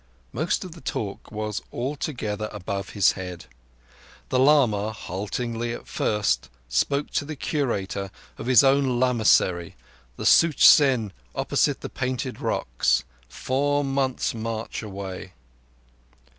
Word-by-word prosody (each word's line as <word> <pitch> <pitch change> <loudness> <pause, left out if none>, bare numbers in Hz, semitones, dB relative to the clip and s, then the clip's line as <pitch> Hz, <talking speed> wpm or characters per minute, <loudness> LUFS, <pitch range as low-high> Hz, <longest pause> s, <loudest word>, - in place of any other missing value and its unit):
Most 160 +5 -1
of 185 - -8
the 165 0 -12
talk 100 -2 -4
was 105 -1 -3
altogether 120 -5 -3
above 100 -1 -4
his 100 - +5
head. 90 -3 -7 0.8
The 130 - +1
lama, 125 -7 +4
haltingly 115 +4 -4
at - - -8
first, 100 - 0 0.2
spoke 140 - 0
to - - 0
the 155 +2 -6
Curator 100 -10 -2 0.3
of - - -6
his 125 -4 +7
own 135 -2 +3
lamassery, 110 -8 +2 0.4
the - - -5
Such 165 -3 +5
zen, 130 -8 +5 0.2
opposite - - +1
the - - -4
Painted 125 -1 -3
Rocks, - - +1 0.3
four 145 - 0
months' 135 -2 0
march 115 0 -4
away. 95 -3 -7
115 Hz, 120 wpm, -25 LUFS, 100-135 Hz, 0.8 s, his